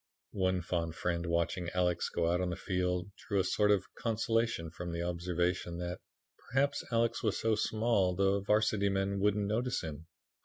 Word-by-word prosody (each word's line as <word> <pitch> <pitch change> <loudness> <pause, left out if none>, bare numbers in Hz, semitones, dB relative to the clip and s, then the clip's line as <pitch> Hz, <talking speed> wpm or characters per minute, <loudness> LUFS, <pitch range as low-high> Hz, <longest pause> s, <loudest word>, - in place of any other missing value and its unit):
One 95 -2 +1
fond 85 -2 -2
friend 85 0 -1
watching 85 +1 0
Alex 90 -1 +1
go 85 0 +1
out 90 +1 +1
on 90 - 0
the 90 - -2
field 90 0 -1
drew 100 -2 -1
a - - +3
sort 105 +2 +2
of 100 -2 +3
consolation 115 -6 0
from 85 +1 -6
the 85 0 -2
observation 85 0 -1
that 90 0 -4 0.5
"perhaps 140 +3 +1
Alex 115 0 +1
was 105 -3 0
so 110 0 +2
small 110 -4 +1
the 100 +1 +3
Varsity 105 0 +2
men 100 0 0
wouldn't 105 +1 +2
notice 120 +4 0
him." 80 0 -7
95 Hz, 170 wpm, -32 LUFS, 85-105 Hz, 0.5 s, a